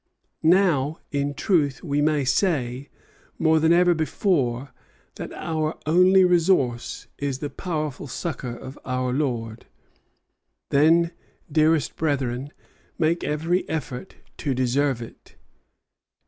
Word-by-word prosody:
Now, 160 -4 +3
in 145 0 -1
truth, 155 -5 +1
we 145 -3 0
may 150 -2 +2
say, 130 -3 0 0.5
more 160 0 +3
than 160 +1 +3
ever 175 +1 +5
before, 145 - 0 0.5
that - - -6
our 155 -1 -2
only 185 +4 +5
resource 165 -9 +1
is 140 -2 -2
in - - -23
the 145 - -3
powerful 155 -3 -4
succor 135 -2 -4
of 130 +2 -10
our 130 -1 -1
Lord. 120 -5 -3 1.0
Then, 165 +4 +4 0.4
dearest 155 -1 +2
brethren, 140 -3 -1 0.5
make 165 +1 +1
every 165 +5 -1
effort 150 0 -5 0.2
to 140 -4 -2
deserve 130 0 +1
it. 115 - -15
150 Hz, 115 wpm, -24 LUFS, 130-165 Hz, 1.0 s, ever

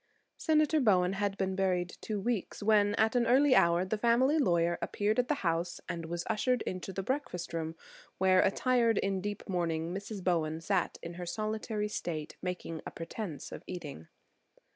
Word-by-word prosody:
Senator 310 -1 +3
Bowen 190 -7 +3
had 200 0 -1
been 190 -1 -1
buried 180 -2 0
two 215 -2 -3
weeks 220 -1 -2
when, 205 -1 +4
at 220 +2 +2
an 240 -1 +3
early 265 +3 +5
hour, 170 -4 +4
the 210 +3 -2
family 255 +7 +3
lawyer 170 - +2
appeared 210 +3 0
at 250 - +2
the 300 - +1
house 170 +1 0
and 165 -1 -4
was 170 +1 -4
ushered 240 +2 +1
into 185 +1 -4
the 195 +1 -4
breakfast 250 - -3
room 160 -1 -3 0.4
where, 185 0 +5
attired 235 +1 +2
in 195 -1 0
deep 205 +1 -5
mourning, 170 -2 -1
Mrs. 200 0 -6
Bowen 160 -3 +1
sat 180 +2 0
in 170 +1 -6
solitary 215 +3 -2
state 160 -7 -4
making 180 -3 -4
a - - -5
pretense 165 -1 -6
of - - -7
eating. 150 - -7
195 Hz, 170 wpm, -31 LUFS, 175-220 Hz, 0.4 s, early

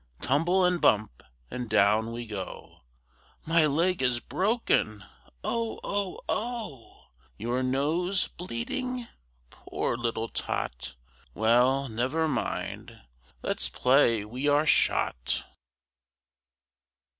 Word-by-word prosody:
Tumble 170 +8 +2
and 180 -1 +1
bump! 105 - +2 0.3
and 125 -2 -4
down 110 +2 +3
we 120 +1 -5
go! 100 -4 -7 0.7
My 165 -1 +4
leg 170 +4 +1
is 125 -2 +2
broken! 185 - 0 0.4
oh! 230 -1 -2
oh! 200 -2 -1
OH!! 220 - -4 0.3
Your 120 +4 -1
nose 155 +9 +1
bleeding? 240 - -4 0.4
poor - - -3
little 115 -1 -2
Tot! 60 - -4 0.4
Well, 125 +5 +3
never 130 +8 0
mind! 150 - -3 0.4
let's - - -1
play 125 -5 +3
we 125 +6 -3
are 145 +1 +4
shot! 60 - +2
130 Hz, 100 wpm, -28 LUFS, 115-180 Hz, 0.7 s, My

